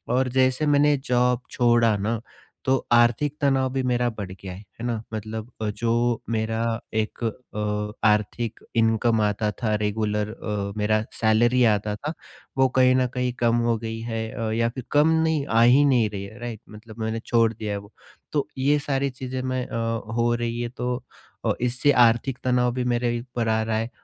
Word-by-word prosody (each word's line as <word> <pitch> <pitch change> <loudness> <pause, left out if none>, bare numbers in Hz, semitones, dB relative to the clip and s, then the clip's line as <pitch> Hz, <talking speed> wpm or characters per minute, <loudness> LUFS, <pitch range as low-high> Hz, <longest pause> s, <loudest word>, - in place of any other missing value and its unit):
और 130 0 +2
जैसे 130 +3 +2
मैंने 145 0 +4
जॉब 125 -1 +1
छोड़ा 120 -3 +3
ना, 110 +3 -1 0.5
तो 130 - +4 0.2
आर्थिक 120 +5 +3
तनाव 135 -2 +2
भी 135 - 0
मेरा 125 -1 +1
बढ़ 100 -5 -7
गया, 95 -1 -8
है 100 +4 -12
ना? 115 -3 -1
मतलब 110 +2 -5
अ, 110 - 0
जो 115 +2 0
मेरा 110 0 -1 0.3
एक 110 +2 -2
अ, 105 -2 -2
आर्थिक 105 +2 0 0.2
इनकम 115 0 +2
आता 105 +1 +1
था 110 -2 +1
रेगुलर 105 0 -1
अ, 100 -3 -4
मेरा 110 +1 +2 0.2
सैलरी 120 +3 +3
आता 105 -1 +1
था, 150 +9 -5 0.4
वो 130 0 +5
कहीं 130 0 +5
न 130 -1 +2
कहीं 125 -1 0
कम 120 -1 +3
हो 115 - +2
गई 115 0 -5
है 110 -1 -2
अ, 115 -1 -3
या 115 +1 +1
फिर 125 +2 -7
कम 150 +2 +4
नहीं 160 -3 +1
आ 115 0 +3
ही 130 +5 +6
नहीं 120 -6 +3
रही 100 -1 -5
है 110 +4 -10
राइट? 120 -3 -6
मतलब 110 +1 -12
मैंने 110 +1 -2
छोड़ 115 -2 +3
दिया 110 -1 -5
है - - -2
वो। 100 +2 -15 0.4
तो 145 -2 0
ये 140 +3 +3
सारी 140 -1 -1
चीज़ें 130 0 -5
मैं 130 -1 -2
अ, - - -4 0.4
हो 120 0 +2
रही 120 0 -3
है 120 - -2
तो 125 0 -3 0.5
अ, - - +3
इससे 125 +4 +2
आर्थिक 120 +1 +3
तनाव 125 -1 +2
भी 125 - -1
मेरे 120 0 0
ही 120 - -2
ऊपर 120 -1 -4
आ 110 0 +2
रहा 110 0 -1
है 115 +1 -2
115 Hz, 190 wpm, -24 LUFS, 110-125 Hz, 0.5 s, ही